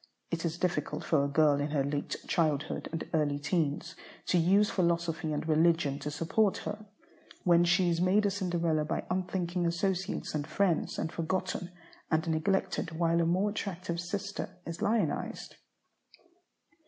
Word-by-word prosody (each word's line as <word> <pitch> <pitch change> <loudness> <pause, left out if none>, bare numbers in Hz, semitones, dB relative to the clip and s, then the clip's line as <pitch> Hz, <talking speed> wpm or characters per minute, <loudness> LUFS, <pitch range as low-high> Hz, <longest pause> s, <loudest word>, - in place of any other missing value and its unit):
It 170 0 -2
is 165 0 -2
difficult 180 +1 -1
for 150 -4 +2
a - - +1
girl 145 0 +4
in 145 +1 -1
her 145 -2 +1
late 145 +1 -2
childhood 155 -3 0
and 165 -1 -4
early 150 -3 +2
teens 150 0 -1 0.3
to 180 - +3
use 195 +5 +4
philosophy 170 -3 0
and 150 +1 -2
religion 160 -3 +3
to 150 - -4
support 165 +7 +1
her, 215 0 -5 0.6
when 175 -1 +5
she 175 +1 +3
is 170 0 0
made 195 +4 +3
a 200 - +2
Cinderella 170 -5 0
by 150 - -2
unthinking 180 -1 -1
associates 190 +2 -1
and 150 -1 -2
friends, 190 -5 +1
and 160 - -2
forgotten 180 +1 -2 0.4
and 160 0 +1
neglected 165 0 0
while 170 0 +2
a 165 - +2
more 190 +5 +2
attractive 185 -5 -4
sister 190 +1 -4
is 170 0 -6
lionized. 210 -8 -1
170 Hz, 155 wpm, -30 LUFS, 155-185 Hz, 0.6 s, when